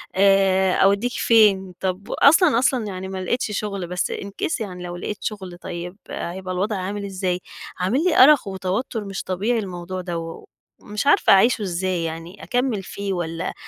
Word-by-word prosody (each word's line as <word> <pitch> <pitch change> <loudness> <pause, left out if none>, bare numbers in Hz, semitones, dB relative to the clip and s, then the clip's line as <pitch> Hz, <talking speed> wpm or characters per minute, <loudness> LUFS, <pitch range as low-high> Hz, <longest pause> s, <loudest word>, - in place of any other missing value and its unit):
آآ 190 -1 +4
أودّيك 200 +5 +3
فين؟ 200 -5 +3
طَب 190 +2 -3
وأصلًا، 280 -4 +5
أصلًا 255 -3 +1
يعني 190 -1 -5
ما 190 0 -5
لقيتش 220 +3 -1
شُغل، 200 -4 -4
بس 180 +1 -2
in 200 - -5 0.2
case 320 - 0
يعني 180 -4 -6
لو 175 0 -6
لقيت 195 +3 -6
شُغل، 190 -5 -5
طيّب 175 +2 -6
هيبقى 185 +1 -5
الوضع 205 +4 -1
عامل 200 +2 -4
إزاي؟ 185 -2 -2 0.4
عامل 230 - +1
لي 365 -3 +2
أرق 290 -4 +6
وتوتر 195 +4 -3
مش 195 -1 -5
طبيعي 210 +6 -1
الموضوع 185 -1 -5
دَوّة، 165 -2 -5
و - - -15 0.4
ومش 210 +5 -4
عارفة - - +5
أعيشه 220 +4 +4
إزاي 185 -2 -1
يعني، 165 +4 -6
أكمّل 245 -5 -1
فيه 200 +1 -4
والّا 165 -2 -3
190 Hz, 170 wpm, -22 LUFS, 180-210 Hz, 0.4 s, أرق